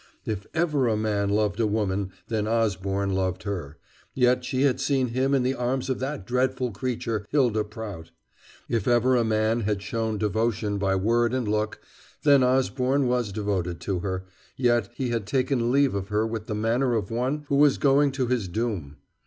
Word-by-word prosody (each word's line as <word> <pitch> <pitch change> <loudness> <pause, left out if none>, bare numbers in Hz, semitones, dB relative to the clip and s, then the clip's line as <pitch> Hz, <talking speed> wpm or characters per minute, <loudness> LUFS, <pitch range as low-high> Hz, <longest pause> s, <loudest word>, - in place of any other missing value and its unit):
If 105 -2 -4
ever 150 -6 +2
a 110 -2 +1
man 105 -2 0
loved 105 +1 +1
a 115 - +3
woman 100 -2 -1 0.2
then 110 -2 -1
Osborne 100 -3 0
loved 95 -1 -1
her, 85 -8 -5 0.4
yet 125 0 +3
she 130 +1 0
had 135 -3 +2
seen 135 -3 +1
him 130 +3 +1
in 130 - +2
the 130 +1 +1
arms 130 +1 -1
of 130 - -2
that 130 -7 -4
dreadful 125 +1 0
creature, 115 -1 -3
Hylda 120 -7 +2
Prout. 105 -6 -8 0.6
If 115 -4 -1
ever 120 +1 +4
a 120 - +3
man 110 +1 +1
had 105 -2 -1
shown 110 -1 -2
devotion 105 0 0
by 95 -1 +1
word 115 +5 +2
and 125 -4 -1
look, 105 0 -1 0.4
then 140 -2 +6
Osborne 130 +1 +2
was 125 -4 0
devoted 95 -4 -2
to 95 -3 -2
her, 95 0 -3 0.3
yet 120 -5 +2
he 130 -1 -2
had 115 -4 -2
taken 125 -1 +1
leave 140 -1 +3
of 100 -1 -3
her 105 +1 +1
with 110 -1 -4
the 110 - -2
manner 120 +4 +1
of 105 -3 -2
one 130 +6 -1
who 140 - +2
was 145 -1 +5
going 140 0 +3
to 135 -1 0
his 120 -5 -1
doom. 90 -8 -3
115 Hz, 185 wpm, -26 LUFS, 105-130 Hz, 0.6 s, then